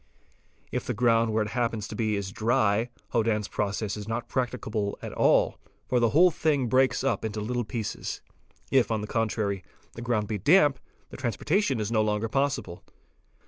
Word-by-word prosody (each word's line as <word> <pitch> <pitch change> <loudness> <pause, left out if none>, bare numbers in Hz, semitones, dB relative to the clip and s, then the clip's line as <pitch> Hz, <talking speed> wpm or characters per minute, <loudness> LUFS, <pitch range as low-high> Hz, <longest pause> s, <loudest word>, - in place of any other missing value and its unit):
If - - -3
the - - -1
ground 115 0 +3
where 110 0 +2
it 105 - -5
happens 115 -3 -1
to - - -7
be 110 -2 0
is 100 -1 -3
dry, 110 0 +1 0.2
Hodann's 110 -2 +1
process 105 0 -2
is 105 -1 -7
not 115 +1 -3
practicable 110 -5 -2
at - - -5
all, - - +3 0.3
for 125 - +2
the 115 -1 +3
whole 175 +8 +5
thing 150 -4 +1
_ - - -3
breaks 130 +1 +3
up 130 -7 0
into 110 -1 -3
little 120 +3 -2
pieces; 110 0 -4 0.5
if 130 -3 +4
on 110 -2 0
the - - -3
contrary 105 -4 -1 0.3
the 115 - -8
ground 115 -3 0
be 105 -2 -3
damp, 145 - +4 0.3
the - - -8
transportation 140 - 0
is 105 +1 -2
no 110 -2 +3
longer 105 +1 0
possible. 135 -9 -1
115 Hz, 185 wpm, -27 LUFS, 105-125 Hz, 0.5 s, whole